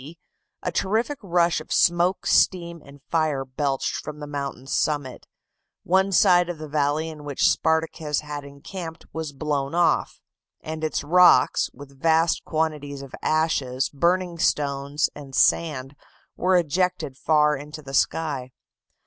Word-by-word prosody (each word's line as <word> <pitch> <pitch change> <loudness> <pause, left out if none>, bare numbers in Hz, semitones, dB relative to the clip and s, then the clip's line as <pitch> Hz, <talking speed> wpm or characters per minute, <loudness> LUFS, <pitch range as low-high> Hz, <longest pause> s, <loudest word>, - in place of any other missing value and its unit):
D., 155 +6 -11 0.5
a 180 - -1
terrific 220 - -1
rush 175 -3 +1
of - - -14
smoke, 175 +2 +2
steam, 170 -3 +2
and 140 0 -16
fire 155 -5 +1
belched 135 +1 -2
from 150 0 -7
the 150 - -6
mountain's 140 -2 -5
summit; 145 -4 -1 0.6
one 190 +2 +2
side 175 -1 +4
of 175 - -4
the 155 0 -7
valley 150 +1 0
in 155 -2 -9
which 145 -2 +1
Spartacus 160 -2 0
had 150 -1 -6
encamped 160 +4 -9
was 160 -2 -4
blown 140 0 -2
off, 175 -1 +1 0.4
and 155 0 -6
its 155 - -1
rocks, 180 +4 +5
with 140 0 -14
vast 165 0 +2
quantities 150 -3 -2
of 135 - -12
ashes, 140 -5 0
burning 170 +3 0
stones, 140 -1 0
and 140 -2 -10
sand, 145 -4 +2 0.4
were 185 +1 +2
ejected 175 -3 0
far 150 +1 +3
into 150 +2 -9
the 135 -1 -9
sky. 140 -2 0
155 Hz, 140 wpm, -24 LUFS, 140-170 Hz, 0.6 s, rocks